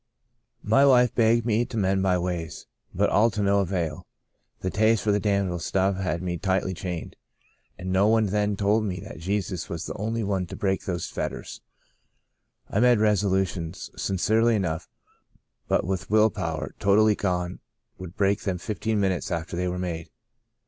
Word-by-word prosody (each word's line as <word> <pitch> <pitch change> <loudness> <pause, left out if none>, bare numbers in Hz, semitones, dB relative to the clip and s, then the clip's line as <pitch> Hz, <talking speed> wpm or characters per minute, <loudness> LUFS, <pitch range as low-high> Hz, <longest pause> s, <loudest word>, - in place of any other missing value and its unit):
My 110 +6 +4
wife 125 -3 +5
begged 115 0 +3
me 115 0 +2
to 115 - -6
mend 95 -1 +1
my 95 -1 +2
ways, 85 -3 -4 0.3
but - - +1
all 110 +3 +4
to 105 -1 -2
no 100 0 +3
avail. 85 -5 -2 0.5
The 95 - -2
taste 110 +1 +2
for 105 - +2
the 105 - +2
damnable 100 -4 0
stuff 95 +3 0
had 90 -2 -2
me 85 -2 -3
tightly 95 -1 0
chained, 90 -2 -5 0.6
and 95 +1 -5
no 95 +2 +3
one 110 0 +4
then 105 +1 0
told 105 +2 +2
me 95 -3 -3
that - - -9
Jesus 95 0 -2
was 85 0 -4
the - - -5
only 115 +2 -2
one 95 -3 -1
to - - -8
break 95 -2 -1
those 90 -3 -2
fetters. - - -5 1.1
I 100 - -1
made 125 0 +5
resolutions, 95 -5 0
sincerely 110 +5 +2
enough, 85 -4 -2 0.8
but - - +1
with 95 -1 -3
will 110 +1 +4
power 80 -5 -4
totally 105 +2 +4
gone 90 -2 -2 0.4
would 95 0 -9
break 100 -1 +2
them 95 -3 -2
fifteen 105 +3 -2
minutes 95 -3 0
after 85 0 -3
they 90 +1 -1
were 90 0 -2
made. 85 -3 -4
95 Hz, 170 wpm, -25 LUFS, 90-105 Hz, 1.1 s, wife